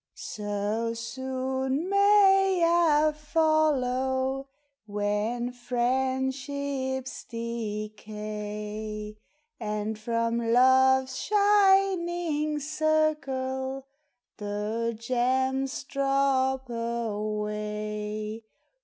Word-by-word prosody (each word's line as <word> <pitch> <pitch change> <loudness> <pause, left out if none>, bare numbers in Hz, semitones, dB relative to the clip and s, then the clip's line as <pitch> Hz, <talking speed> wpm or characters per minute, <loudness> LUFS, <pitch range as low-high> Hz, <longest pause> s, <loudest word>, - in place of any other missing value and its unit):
So 210 +2 -3
soon 260 +4 -2
may 380 -6 +4
/ - - -15
follow, 270 -4 +1 0.4
When 210 +4 -1
friendships 265 +2 -2
decay, 215 -1 -5 0.4
And 210 -1 -3
from 230 +1 0
love's 260 +2 +4
shining 375 -7 +2
circle 275 -3 -1 0.5
The 215 +2 -2
gems 260 +3 0
drop 270 -1 +1
away 210 -1 -3
260 Hz, 55 wpm, -27 LUFS, 215-280 Hz, 0.5 s, may